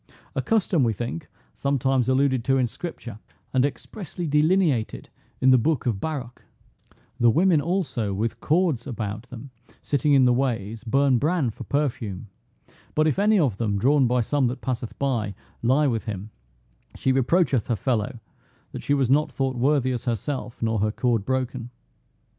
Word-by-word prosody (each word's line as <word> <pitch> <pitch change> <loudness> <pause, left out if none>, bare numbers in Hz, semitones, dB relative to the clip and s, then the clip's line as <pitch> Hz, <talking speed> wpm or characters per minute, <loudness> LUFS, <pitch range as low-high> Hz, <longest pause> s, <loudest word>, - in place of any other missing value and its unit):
A - - -1
custom, 195 - +2
we 115 -2 +2
think, 120 +8 -5 0.3
some 140 0 0
times 130 -1 +1
alluded 130 -2 +2
to 135 0 +3
in 130 - +2
scripture, 120 -5 -7 0.3
and 130 -1 +3
expressly 175 +5 -4
delineated 150 - +1 0.3
in 130 0 +5
the 130 - +6
book 145 +2 0
of 115 -6 0
Baruch: 135 -7 -5 0.8
"The 120 - +5
women 165 +4 +4
also, 140 - -1
with 110 +4 -2
cords 155 -6 +1
about 110 -1 -5
them, 130 +2 -9 0.3
sitting 145 +1 +1
in 135 -2 +6
the 125 - +4
ways, 115 -4 -2
burn 135 +1 +2
bran 150 -4 +1
for - - -9
perfume; 115 -9 -2 0.7
but, 155 - +3
if 155 +4 +1
any 210 +1 +4
of 130 - +1
them, 105 -3 0
drawn 135 +5 +3
by 125 +1 +2
some 135 +3 +1
that 120 - -4
passeth 125 -3 -4
by, 115 -8 -1 0.3
lie 130 +6 +3
with 115 -5 0
him, 105 -1 -5 0.6
she 130 - 0
reproacheth 135 - +2
her 120 - +1
fellow 115 +1 -1 0.5
that - - -6
she 145 - +1
was 135 -3 +2
not 150 +2 +3
thought 135 -1 -1
worthy 130 +1 +2
as 125 -1 -3
herself, 120 +1 -3
nor 110 -1 +1
her 105 +1 +1
cord 115 -3 0
broken." 130 -1 -2
130 Hz, 170 wpm, -24 LUFS, 115-145 Hz, 0.8 s, the